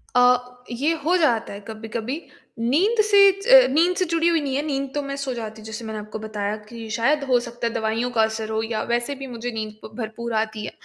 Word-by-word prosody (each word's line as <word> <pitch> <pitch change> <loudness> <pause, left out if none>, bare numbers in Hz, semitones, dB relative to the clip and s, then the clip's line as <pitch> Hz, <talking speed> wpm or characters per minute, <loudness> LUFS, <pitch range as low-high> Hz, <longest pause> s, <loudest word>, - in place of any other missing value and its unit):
अ, 250 0 +3
ये 280 +7 +1
हो 350 +3 +3
जाता 240 - +1
है 200 - -7
कभी-कभी। 225 +6 -5 0.4
नींद 350 - +3
से 410 -1 +5 0.3
ज - - +8
नींद 345 +4 +3
से 370 - +2
जुड़ी 335 0 +1
हुई 335 -2 +3
नहीं 275 -2 -2
है, 280 - +1
नींद 275 -2 -2
तो 290 - +1
मैं 275 0 -4
सो 275 -2 -3
जाती 220 -2 -6
हूँ, - - -13
जैसे 220 +1 -6
मैंने 220 -1 -5
आपको 210 +1 -7
बताया 210 -1 -3
कि 230 -2 -8
शायद 280 +5 +2
हो 250 -1 +5
सकता 240 0 -4
है 230 - -3
दवाइयों 225 +2 -1
का 225 -2 +3
असर 220 0 -2
हो 220 0 -1
या 220 -1 -2
वैसे 240 +4 0
भी 270 0 -7
मुझे 245 -1 -5
नींद 215 -2 -4
ब - - -10
भरपूर 235 0 -5
आती 220 -1 -4
है। - - -5
240 Hz, 240 wpm, -23 LUFS, 220-280 Hz, 0.4 s, ज